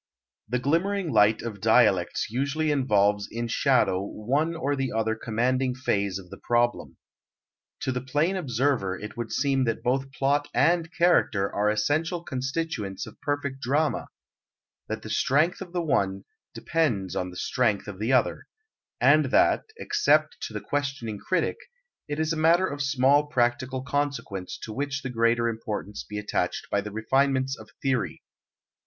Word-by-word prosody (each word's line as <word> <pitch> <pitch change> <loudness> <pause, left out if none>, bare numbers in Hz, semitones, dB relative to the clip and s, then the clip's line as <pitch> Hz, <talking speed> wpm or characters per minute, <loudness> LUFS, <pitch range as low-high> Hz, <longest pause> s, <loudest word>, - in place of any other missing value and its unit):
The 125 - +1
glimmering 170 +7 0
light 105 -1 +4
of 105 -4 -6
dialectics 105 -4 +3
usually 145 +5 0
involves 105 -7 +2
in 120 +1 -3
shadow 115 -7 +2
one 140 +11 -1
or 145 -3 -1 0.2
other 110 0 +1
commanding 125 +3 0
phase 100 -6 -1
of 90 -2 -12
the - - -9
problem. 120 0 0 0.8
To 130 - -1
the 125 0 -2
plain 150 +8 0
observer 130 - 0
it 105 - -8
would 120 -2 -5
seem 135 -2 +1
that 115 -1 -2
both 135 +2 0
plot 140 +2 +1
and 165 +2 +3
character 145 - +2
are 105 +1 +2
essential 155 +11 0
constituents 130 - -3
of - - -14
perfect 140 -2 -2
drama; 145 +4 0 0.8
that - - -4
the - - -7
strength 155 +8 +2
of 180 -3 -7
the 175 -1 -1
one 100 -10 0 0.3
depends 115 - 0
on 90 - -2
the 90 - -10
strength 110 -6 0
of 100 -2 -7
the 110 +4 0
other; 130 - +1 0.5
and - - +5
that, - - +3
except 420 -2 +2
to - - -12
the - - -4
questioning 135 -7 -3
critic, 185 - 0 0.5
it 145 0 -3
is 160 +1 +1
a - - -2
matter 165 +4 +4
of 145 -5 -4
small 140 +2 +3
practical 130 0 0
consequence 140 -10 -3
to 110 - -6
which 140 +2 -3
the 130 - -4
greater 115 0 +2
importance 110 -2 -4
be 105 - -7
attached 105 0 -2
by 100 - +2
the 105 - -6
refinements 135 +4 +1
of 110 -3 -13
theory. 130 -3 -1
130 Hz, 155 wpm, -26 LUFS, 110-145 Hz, 0.8 s, and